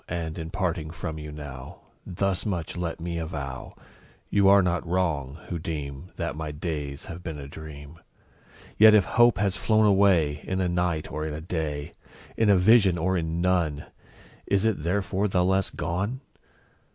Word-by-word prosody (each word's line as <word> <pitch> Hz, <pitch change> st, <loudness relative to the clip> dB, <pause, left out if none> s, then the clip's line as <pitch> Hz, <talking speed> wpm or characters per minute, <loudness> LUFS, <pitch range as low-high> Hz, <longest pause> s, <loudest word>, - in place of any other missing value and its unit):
And, 80 Hz, -1 st, -4 dB
in 80 Hz, 0 st, -5 dB
parting 85 Hz, -4 st, -2 dB
from 80 Hz, -1 st, -5 dB
you 75 Hz, 0 st, -7 dB
now, 70 Hz, -3 st, -9 dB, 0.3 s
Thus 95 Hz, +1 st, -1 dB
much 90 Hz, -6 st, -3 dB
let 85 Hz, -1 st, -3 dB
me 85 Hz, 0 st, -3 dB
avow 70 Hz, -5 st, -6 dB, 0.6 s
You 100 Hz, -1 st, +5 dB
are 100 Hz, -1 st, +7 dB
not 90 Hz, -1 st, 0 dB
wrong, 80 Hz, -6 st, -1 dB
who 85 Hz, -, -3 dB
deem 75 Hz, 0 st, -5 dB
That 85 Hz, -2 st, -3 dB
my 80 Hz, 0 st, -4 dB
days 75 Hz, -2 st, -5 dB
have 85 Hz, +1 st, -8 dB
been 80 Hz, -4 st, -6 dB
a 70 Hz, -1 st, -8 dB
dream; 75 Hz, +1 st, -10 dB, 0.8 s
Yet 110 Hz, 0 st, +9 dB
if 100 Hz, -, +5 dB
Hope 120 Hz, -2 st, +4 dB
has 100 Hz, -2 st, +1 dB
flown 110 Hz, +1 st, +3 dB
away 95 Hz, -8 st, +3 dB
In 95 Hz, -, -2 dB
a 95 Hz, -, +1 dB
night, 85 Hz, -3 st, -1 dB
or 75 Hz, +2 st, -3 dB
in 75 Hz, -, -4 dB
a -, -, -5 dB
day, 80 Hz, -3 st, -4 dB, 0.4 s
In 110 Hz, -2 st, +2 dB
a 100 Hz, -, +6 dB
vision, 95 Hz, -1 st, +5 dB
or 95 Hz, +3 st, 0 dB
in 85 Hz, -1 st, -1 dB
none, 85 Hz, -5 st, +1 dB, 0.6 s
Is 100 Hz, +1 st, +2 dB
it 110 Hz, -8 st, +1 dB
therefore 95 Hz, +4 st, 0 dB
the 90 Hz, -2 st, +1 dB
less 95 Hz, 0 st, +2 dB
gone? 100 Hz, +10 st, -3 dB
85 Hz, 175 wpm, -26 LUFS, 75-95 Hz, 0.8 s, Yet